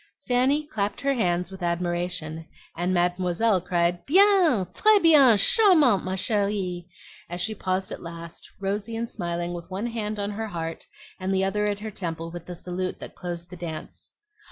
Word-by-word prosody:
Fanny 260 Hz, +5 st, +2 dB
clapped 210 Hz, -8 st, -3 dB
her 275 Hz, 0 st, +2 dB
hands 180 Hz, -6 st, 0 dB
with 190 Hz, -, -10 dB
admiration, 175 Hz, -2 st, -2 dB, 0.3 s
and 175 Hz, +2 st, -1 dB
Mademoiselle 180 Hz, +3 st, +1 dB
cried, 175 Hz, 0 st, 0 dB
"Bien, 360 Hz, -, +5 dB
tres 430 Hz, -1 st, +5 dB
bien, 285 Hz, -, +7 dB
charmante, 305 Hz, -, +5 dB
ma 185 Hz, 0 st, -2 dB
cherie!" 190 Hz, -3 st, -1 dB, 0.4 s
as 175 Hz, +1 st, -5 dB
she 220 Hz, +5 st, -1 dB
paused 190 Hz, -2 st, -2 dB
at -, -, -6 dB
last, 170 Hz, 0 st, -8 dB
rosy 205 Hz, +3 st, -2 dB
and 230 Hz, +1 st, -2 dB
smiling, 175 Hz, -3 st, -3 dB
with 170 Hz, 0 st, -8 dB
one 195 Hz, +4 st, -3 dB
hand 215 Hz, -3 st, -3 dB
on 205 Hz, 0 st, -2 dB
her 220 Hz, +2 st, -4 dB
heart 165 Hz, -4 st, -5 dB, 0.3 s
and 185 Hz, +1 st, -2 dB
the 190 Hz, 0 st, +2 dB
other 210 Hz, +2 st, 0 dB
at 205 Hz, 0 st, -2 dB
her 220 Hz, 0 st, -5 dB
temple 165 Hz, -3 st, -5 dB
with 175 Hz, -1 st, -9 dB
the 180 Hz, -, -6 dB
salute 180 Hz, +1 st, -4 dB
that -, -, -9 dB
closed 175 Hz, 0 st, -6 dB
the -, -, -7 dB
dance. 170 Hz, -3 st, -7 dB
185 Hz, 175 wpm, -25 LUFS, 175-220 Hz, 0.4 s, bien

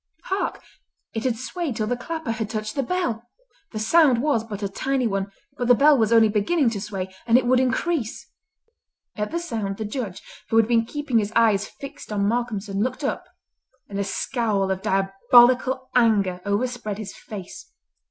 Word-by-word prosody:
Hark! 385 Hz, +1 st, -2 dB, 0.5 s
it 225 Hz, +1 st, -3 dB
had 245 Hz, -3 st, +1 dB
swayed 280 Hz, +2 st, -4 dB
till 215 Hz, -1 st, -1 dB
the 245 Hz, -, -1 dB
clapper 320 Hz, +2 st, -4 dB
had 220 Hz, -2 st, -3 dB
touched 215 Hz, -1 st, -3 dB
the 275 Hz, -, 0 dB
bell. 240 Hz, -7 st, -2 dB, 0.4 s
The 220 Hz, -, -6 dB
sound 260 Hz, +3 st, +4 dB
was 285 Hz, -7 st, +2 dB
but 210 Hz, -2 st, -7 dB
a -, -, +1 dB
tiny 265 Hz, +6 st, -1 dB
one, 195 Hz, -2 st, -1 dB, 0.3 s
but 245 Hz, -, 0 dB
the 245 Hz, -, +7 dB
bell 290 Hz, +4 st, +6 dB
was 225 Hz, -4 st, +2 dB
only 225 Hz, -1 st, +6 dB
beginning 230 Hz, +6 st, +1 dB
to 205 Hz, -3 st, -4 dB
sway, 190 Hz, -3 st, -5 dB
and 230 Hz, +1 st, +6 dB
it 255 Hz, -, +1 dB
would 250 Hz, +1 st, +4 dB
increase. 260 Hz, 0 st, -1 dB, 0.9 s
At 210 Hz, -1 st, -2 dB
the 335 Hz, -, -2 dB
sound 220 Hz, -12 st, -3 dB
the 220 Hz, -, -4 dB
Judge, 210 Hz, -4 st, -5 dB, 0.3 s
who 225 Hz, -, +2 dB
had 225 Hz, -1 st, +5 dB
been 230 Hz, -1 st, +3 dB
keeping 290 Hz, -4 st, 0 dB
his 210 Hz, 0 st, -2 dB
eyes 215 Hz, -3 st, +3 dB
fixed 280 Hz, -3 st, -10 dB
on 200 Hz, -1 st, +1 dB
Malcolmson, 215 Hz, -4 st, -2 dB
looked 255 Hz, +5 st, -2 dB
up, 355 Hz, +6 st, -2 dB, 0.6 s
and 200 Hz, 0 st, -5 dB
a -, -, +1 dB
scowl 200 Hz, -1 st, -1 dB
of 190 Hz, 0 st, -2 dB
diabolical 245 Hz, +8 st, +3 dB
anger 205 Hz, -7 st, +3 dB
overspread 215 Hz, 0 st, -2 dB
his 210 Hz, -2 st, -7 dB
face. 195 Hz, -4 st, -9 dB
230 Hz, 180 wpm, -24 LUFS, 205-255 Hz, 0.9 s, the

